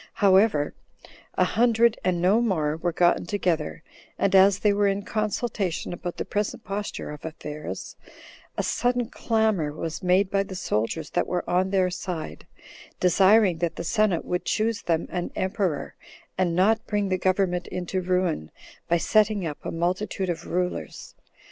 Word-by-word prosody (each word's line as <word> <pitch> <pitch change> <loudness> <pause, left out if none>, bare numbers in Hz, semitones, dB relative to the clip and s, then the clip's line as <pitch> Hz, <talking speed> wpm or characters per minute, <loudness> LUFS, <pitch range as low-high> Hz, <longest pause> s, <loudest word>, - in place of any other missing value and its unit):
However, 190 -7 +3 0.6
a - - +3
hundred 230 +3 +3
and 180 -1 +1
no 195 +6 +3
more 160 -10 0
were 175 +2 -1
gotten 175 +1 +2
together; 170 -7 -1 0.3
and 195 - +1
as 195 0 +6
they 205 0 +2
were 205 0 +2
in 200 +1 0
consultation 215 -5 -2
about 175 0 -6
the - - -3
present 210 0 -2
posture 200 -4 -4
of 150 - -9
affairs, 150 -2 -7 0.6
a - - 0
sudden 245 -1 0
clamor 220 -9 +1
was 160 +3 -5
made 185 +1 +2
by 195 - +2
the 195 -1 -6
soldiers 150 - -2
that - - 0
were 180 - -2
on 185 +2 +1
their 190 -2 +2
side, 165 - -6 0.5
desiring 190 0 +4
that 170 -1 -1
the - - -5
senate 210 -2 +1
would 180 0 -2
choose 220 0 0
them 165 -1 0
an 175 -1 -2
emperor, 185 -5 -1 0.4
and 180 -3 0
not 215 +5 +2
bring 205 -2 0
the 185 -1 0
government 185 -1 +1
into 180 +1 -3
ruin 180 - 0 0.4
by 170 - +3
setting 210 +1 +2
up 150 -2 -6
a - - -4
multitude 180 +2 -1
of 160 - -6
rulers. 180 +1 -3
185 Hz, 160 wpm, -25 LUFS, 170-205 Hz, 0.6 s, as